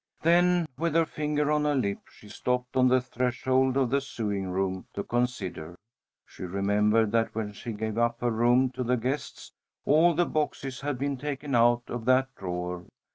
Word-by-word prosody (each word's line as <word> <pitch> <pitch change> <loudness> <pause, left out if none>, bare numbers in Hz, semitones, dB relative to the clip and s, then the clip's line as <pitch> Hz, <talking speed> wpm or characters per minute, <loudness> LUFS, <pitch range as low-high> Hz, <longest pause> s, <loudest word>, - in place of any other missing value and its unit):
Then, 175 +1 +4
with 165 -1 0
her 165 0 +4
finger 150 -1 -1
on 150 0 +2
her 150 -1 +1
lip, 100 -7 -1
she 105 - -16
stopped 125 +3 -2
on 130 -1 +5
the 130 0 +4
threshold 130 +1 0
of 130 -3 +1
the 140 +1 +2
sewing 105 -8 -3
room 95 0 -2
to 100 - -2
consider. 105 -9 -3 0.5
She - - -16
remembered 105 +4 +1
that 115 -1 0
when 110 -2 -3
she 115 +3 -7
gave 110 +1 -3
up 120 0 +1
her 120 -1 +1
room 120 +3 +3
to 130 0 -4
the 125 +1 +1
guests, 130 +5 -4 0.3
all 165 +3 +4
the 175 +2 +3
boxes 135 -5 -3
had 145 -2 -2
been 140 +1 -2
taken 140 +1 -4
out 120 0 +4
of 120 -2 -5
that 130 +1 +3
drawer. 90 -1 -5
125 Hz, 185 wpm, -27 LUFS, 110-140 Hz, 0.5 s, on